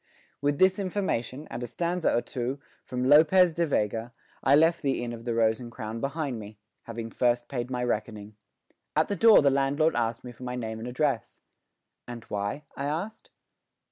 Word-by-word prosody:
With 145 0 +1
this 185 +3 +4
information 155 - -2
and 120 - -5
a 120 - -3
stanza 170 +6 0
or 120 - +1
two 130 +2 -4 0.2
from 125 0 -3
Lopez 160 +6 +6
de 170 +1 0
Vega 115 -2 -1 0.3
I 135 +2 +5
left 165 +3 +4
the 135 -4 0
Inn 120 -1 -4
of 115 0 -9
the 120 -2 -1
Rose 110 0 +2
and 120 -2 -8
Crown 110 +1 -6
behind 140 -3 -2
me, 105 0 -10 0.3
having 115 -1 -6
first 120 -1 +1
paid 125 -2 -4
my 125 -1 -2
reckoning. 105 -3 -3 0.6
At - - +2
the 200 - 0
door 220 -2 +7
the 140 - +5
landlord 140 +4 +2
asked 115 -1 -1
me 125 - -8
for 120 - -18
my 125 0 -4
name 110 -2 -4
and 115 - -6
address. 125 -2 -2 0.6
"And 120 -2 -7
why?" 100 +8 -3
I 140 - -3
asked. 175 +10 -4
125 Hz, 190 wpm, -27 LUFS, 115-150 Hz, 0.6 s, door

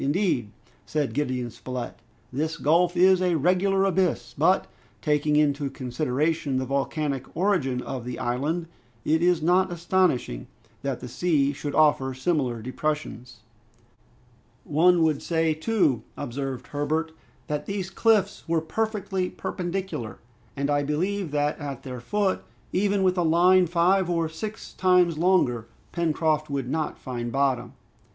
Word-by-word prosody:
"Indeed," 145 - +1 0.4
said 150 -3 -1
Gideon 130 -4 -2
Spilett, 125 0 -6 0.4
"this 155 +4 -1
gulf 175 +4 +2
is 185 +1 +5
a 180 -2 +2
regular 185 +5 +2
abyss, 185 -3 0
but, - - +3 0.3
taking 150 0 +1
into 145 -1 +2
consideration 135 +3 -1
the 130 - -1
volcanic 140 0 -1
origin 155 -10 +1
of 130 -3 -5
the 125 0 -5
island, 145 +8 -1 0.4
it 160 +1 +2
is 175 -2 +3
not 180 +2 +3
astonishing 170 - 0 0.3
that 135 -3 -3
the - - -6
sea 145 0 +1
should 145 +1 -5
offer 140 -4 +3
similar 130 -5 -1
depressions." 130 -3 -4 1.2
"One 170 +3 +4
would 155 -3 +1
say 165 -1 +1
too," 155 - +1 0.2
observed 135 0 -4
Herbert, 155 +2 -1 0.3
"that 150 0 -3
these 195 -2 -3
cliffs 205 -2 +2
were 165 0 +2
perfectly 195 +1 -2
perpendicular; 180 - -4 0.4
and 140 +1 0
I 145 0 +2
believe 175 +6 -1
that 145 0 0
at 140 -4 -6
their 125 -2 -6
foot, 195 - 0 0.3
even 200 +1 +2
with 185 -1 +2
a - - +3
line 175 +3 +5
five 175 +2 +2
or 165 -2 +1
six 210 +7 -7
times 180 -3 +3
longer, 135 -11 +2 0.2
Pencroft 155 -2 0
would 135 -3 -2
not 160 -1 -2
find 120 -2 -5
bottom." 130 -3 0
155 Hz, 135 wpm, -25 LUFS, 135-180 Hz, 1.2 s, is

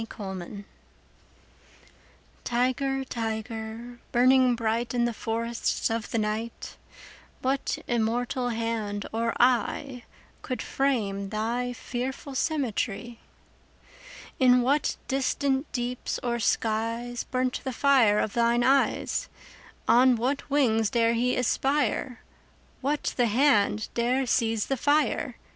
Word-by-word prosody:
The 225 - -5
Tiger 195 -1 -7 1.8
TIGER, 260 +3 0
tiger, 225 0 -5
burning 255 0 +5
bright 230 +1 -1
In 240 -1 +2
the 240 - -1
forests 230 +1 -2
of 225 -1 -2
the - - -1
night, 220 +2 -3 0.7
What 265 +1 0
immortal 245 +2 0
hand 225 -3 -2
or 230 +1 -1
eye 250 +1 +1 0.4
Could 255 - -4
frame 205 -8 -1
thy 235 +4 -2
fearful 260 +3 -5
symmetry? 245 -6 -2 1.2
In 250 -2 +6
what 280 +4 +1
distant 270 +1 0
deeps 245 0 -3
or 235 -1 -1
skies 230 +2 -1
5 - - -32
Burnt 255 -1 -1
the 260 - -2
fire 250 -5 +4
of 210 - 0
thine 235 0 +2
eyes? 270 +2 +1 0.6
On 255 +1 +6
what 260 +6 -2
wings 225 -7 +2
dare 230 -1 +2
he 245 +2 +1
aspire? 255 0 0 0.6
What 290 +3 -1
the 245 -2 +3
hand 220 -3 +2
dare 250 +3 +1
seize 225 -3 +1
the 270 - -1
fire? 290 -2 +1
240 Hz, 115 wpm, -27 LUFS, 225-260 Hz, 1.8 s, In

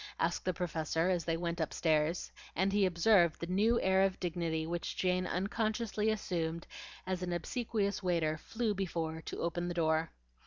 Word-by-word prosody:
asked 170 +1 0
the 185 - +2
Professor 165 -1 0
as 175 -2 0
they 165 -1 0
went 170 0 -2
upstairs, 160 +1 +1 0.2
and 190 +3 +1
he 205 -2 +4
observed 175 -1 +4
the - - -3
new 210 +7 +3
air 190 0 +4
of 195 -1 +2
dignity 165 -2 -1
which 170 +1 -3
Jane 180 0 +1
unconsciously 215 +3 0
assumed 170 -6 -2 0.4
as 185 -1 -2
an 180 -1 -2
obsequious 200 +3 -1
waiter 170 -4 +1
flew 225 +7 -2
before 165 -4 -2
to - - -6
open 175 +1 -1
the 175 - -3
door. 160 -1 +2
175 Hz, 165 wpm, -33 LUFS, 165-195 Hz, 0.4 s, he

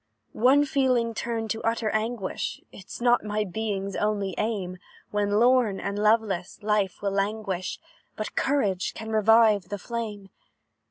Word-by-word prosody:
"One 270 +6 +4
feeling 255 -5 +1
turned 225 -1 -3
to 225 - -3
utter 225 -1 0
anguish, 215 -2 -2
Is 195 - -10
not 240 0 +4
my 210 0 -1
being's 200 -1 -3
only 205 -2 -1
aim; 190 -5 -2 0.3
When, 205 0 +1
lorn 240 -4 +3
and 200 +1 -3
loveless, 210 -4 +1
life 210 -2 0
will 200 - 0
languish, 195 -2 -2 0.4
But 215 - -5
courage 205 -10 0
can 220 0 -6
revive 215 -3 +4
the 205 - -3
flame. 210 -2 -5
215 Hz, 140 wpm, -26 LUFS, 200-230 Hz, 0.4 s, One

